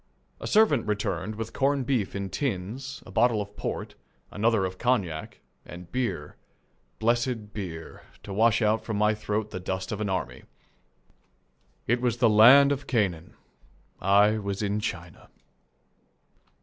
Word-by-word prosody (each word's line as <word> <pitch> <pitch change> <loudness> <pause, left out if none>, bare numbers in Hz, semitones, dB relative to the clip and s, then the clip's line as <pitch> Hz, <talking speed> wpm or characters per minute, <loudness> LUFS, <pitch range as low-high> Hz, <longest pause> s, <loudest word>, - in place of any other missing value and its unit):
A - - -6
servant 210 - +3
returned 105 0 -2
with 115 +1 -6
corn 140 0 +1
beef 120 -7 -1
in 100 -1 -4
tins, 130 +2 -4
a - - -12
bottle 120 -3 +3
of 100 0 -6
port, - - -4 0.4
another 110 -1 +1
of 95 0 -6
cognac, 100 -11 -1 0.2
and 90 0 -11
beer, 125 -1 -3 0.6
blessed 115 -2 -1
beer, 85 -6 -7 0.2
to 100 - -7
wash 115 +3 +3
out 110 +1 +2
from 110 -3 -3
my 105 +1 +3
throat 105 0 -3
the 95 - -5
dust 95 +1 -4
of 105 0 -4
an 105 - -1
army. 65 -9 -3 1.4
It 120 +2 +1
was 120 -2 0
the 115 -3 +4
land 130 +7 +8
of 140 0 -3
Canaan. 95 -9 -1 0.7
I 105 +3 +4
was 100 0 -3
in 105 +1 0
China. 90 -5 -6
105 Hz, 145 wpm, -27 LUFS, 95-120 Hz, 1.4 s, land